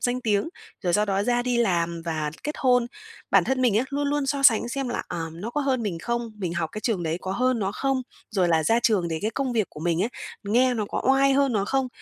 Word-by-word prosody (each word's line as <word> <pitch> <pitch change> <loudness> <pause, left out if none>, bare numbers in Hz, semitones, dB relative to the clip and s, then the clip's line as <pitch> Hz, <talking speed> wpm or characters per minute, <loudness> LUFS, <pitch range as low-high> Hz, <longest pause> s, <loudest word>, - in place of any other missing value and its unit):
danh 250 +1 0
tiếng, 210 +3 +1 0.3
rồi 175 -2 0
sau 210 +3 +3
đó 200 -1 0
ra 245 +1 +1
đi 250 -1 0
làm 170 -6 0
và 155 -2 -2
kết 300 +1 -3
hôn. 250 -2 +3 0.4
Bản - - +5
thân 260 -1 0
mình 235 -5 +3
á, 245 - +1
luôn 285 0 -1
luôn 290 -1 0
so 275 0 -1
sánh 235 -3 +5
xem 265 +1 -3
là, 240 - -2
ờ, 165 -2 -3
nó 185 +8 -6
có 295 - -1
hơn 260 -4 0
mình 190 -6 -3
không? 235 +3 -3
Mình 175 -4 -3
học 165 -2 -1
cái 215 - -5
trường 215 -7 -1
đấy 165 +1 -2
có 190 - -4
hơn 255 +2 +1
nó 195 -1 -1
không? 270 -1 -1 0.3
Rồi 185 -4 +1
là 160 -2 +2
ra 230 +8 +3
trường 195 -8 +2
thì 160 - -1
cái 215 - 0
công 260 +2 -2
việc 220 -4 +1
của 150 - -10
mình 170 +1 +1
ấy, 220 - 0 0.4
nghe 245 +5 +3
nó 220 -3 -1
có - - -3
oai 270 0 +4
hơn 275 -1 +2
nó 200 -3 +1
không? 265 +3 0
230 Hz, 270 wpm, -25 LUFS, 180-255 Hz, 0.4 s, Bản